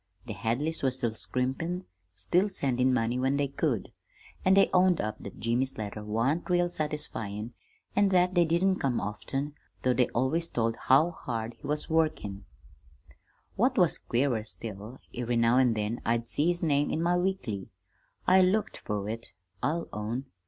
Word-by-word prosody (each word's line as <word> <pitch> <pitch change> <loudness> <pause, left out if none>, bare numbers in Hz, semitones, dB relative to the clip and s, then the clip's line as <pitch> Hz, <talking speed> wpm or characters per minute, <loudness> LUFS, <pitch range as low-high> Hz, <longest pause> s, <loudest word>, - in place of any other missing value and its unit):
The 115 - -5
Hadleys 120 - -1
was 130 -2 +2
still 120 -4 -1
scrimpin', 135 +11 -2 0.3
still 175 - +1
sendin' 130 -8 +1
money 120 0 +1
when 135 +2 +1
they 145 0 +1
could, 135 - -1 0.5
an' 190 +1 +5
they 195 - +6
owned 180 -2 +4
up 110 0 -3
that 100 - -9
Jimmy's 120 +5 0
letters 105 0 -5
wan't 125 - 0
real 175 0 +3
satisfyin' 125 - -3 0.4
an' 205 -1 +4
that 180 -1 +3
they 175 -1 +5
didn't 185 +4 +2
come 130 -4 0
often, 135 +8 -3 0.3
though 130 - +3
they 125 0 +3
always 135 +8 0
told 115 -4 0
how 145 +9 +4
hard 115 -7 -4
he 140 - -11
was 150 +1 -1
workin'. 155 -12 0 1.1
"What - - +2
was - - +3
queerer 120 -3 0
still, 105 +4 -7 0.2
every 120 0 -2
now 115 +2 +4
an' 125 -3 +3
then 110 +2 -2
I'd 115 0 0
see 150 +6 +1
his 175 0 +2
name 145 -2 +2
in 160 - -1
my 175 +1 +3
weekly. 175 - -2 0.6
I 185 +1 +6
looked 195 +4 +1
fer 105 -2 -3
it, 115 0 -6 0.3
I'll 165 +4 -1
own. 115 +5 -3
130 Hz, 165 wpm, -29 LUFS, 115-165 Hz, 1.1 s, they